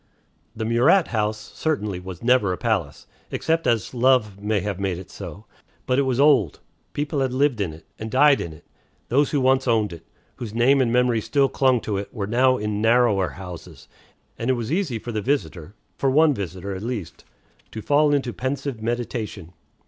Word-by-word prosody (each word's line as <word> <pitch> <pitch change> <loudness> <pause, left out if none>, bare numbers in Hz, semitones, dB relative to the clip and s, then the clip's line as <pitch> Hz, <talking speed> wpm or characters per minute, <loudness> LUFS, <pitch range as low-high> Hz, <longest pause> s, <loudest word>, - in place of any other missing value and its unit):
The 110 - -3
Murat 130 - +3
house, 110 -1 0
certainly, 105 - -3
was 90 0 -9
never 125 -5 +3
a 90 - -2
palace, - - -2 0.2
except 165 0 -1
as 115 -2 0
love 120 -5 +2
may 105 0 0
have 100 -2 -4
made 95 -3 -1
it 90 -1 -10
so. - - -9 0.4
But 130 +1 +1
it 135 -1 +1
was 125 0 0
old; 135 - +4 0.3
people 145 0 -2
had 135 -1 0
lived 135 -4 +1
in 90 -5 -1
it, 80 +1 -14
and 110 - -5
died 140 +4 +4
in 85 - -5
it; 80 - -15 0.4
those 140 +4 +3
who 145 - 0
once 130 0 +2
owned 110 -5 +1
it, 85 -1 -11 0.3
whose 115 -3 -7
name 130 +4 +4
and 120 -3 +1
memory 125 -2 +2
still 140 +4 +2
clung 130 -3 +2
to 105 -2 -2
it, 100 - -5
were 105 -4 -4
now 130 +4 +3
in 105 -1 -2
narrower 110 -4 +3
houses; 90 -4 -10 0.5
and 115 - -2
it - - +4
was 120 0 -4
easy 165 - 0
for 120 +2 -7
the 110 -2 -2
visitor 95 - -2 0.2
for 135 - +2
one 150 +3 +4
visitor, 95 -2 -5
at 95 - -6
least 105 - -5 0.5
to 110 - -8
fall 145 +1 +3
into 135 -4 0
pensive 130 -2 -4
meditation. 110 -6 -4
115 Hz, 195 wpm, -23 LUFS, 100-130 Hz, 0.5 s, old